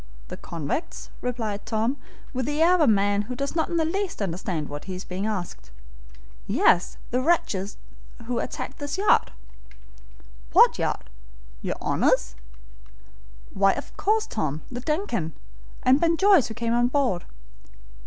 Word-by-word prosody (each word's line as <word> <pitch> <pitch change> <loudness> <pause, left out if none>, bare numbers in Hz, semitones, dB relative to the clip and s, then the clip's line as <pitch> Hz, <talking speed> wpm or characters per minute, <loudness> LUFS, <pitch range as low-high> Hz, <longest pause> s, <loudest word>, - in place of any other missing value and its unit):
"The - - -6
convicts?" 165 - -4
replied 225 -5 -3
Tom, 225 +5 0 0.4
with 255 -1 -2
the 295 +1 -1
air 335 +3 +6
of 365 - +3
a 300 - +5
man 205 -1 +3
who 245 +5 -6
does 280 +4 -3
not 320 - +1
in 340 - -1
the 320 - +2
least 385 +3 -2
understand 175 -5 -2
what 145 0 -7
he 190 - -5
is 180 - -7
being 190 +3 -3
asked. 175 - -4 0.8
"Yes, 175 0 +3
the 250 +1 +1
wretches 215 - 0 0.5
who 240 0 -1
attacked - - -5
the 290 -1 -4
yacht." 405 +2 +4 1.2
"What - - +6
yacht? - - -2 0.5
Your - - -2
Honor's?" - - +1 1.2
"Why, 195 0 +4
of - - -7
course, 430 +2 +1
Tom. 155 -7 -3
The 245 - -4
DUNCAN, 250 - -1 0.5
and 260 +3 +5
Ben 335 -1 +3
Joyce, 385 - +5
who 220 - -7
came 235 -1 -1
on 240 0 +3
board." 255 -9 0
235 Hz, 155 wpm, -25 LUFS, 190-300 Hz, 1.2 s, air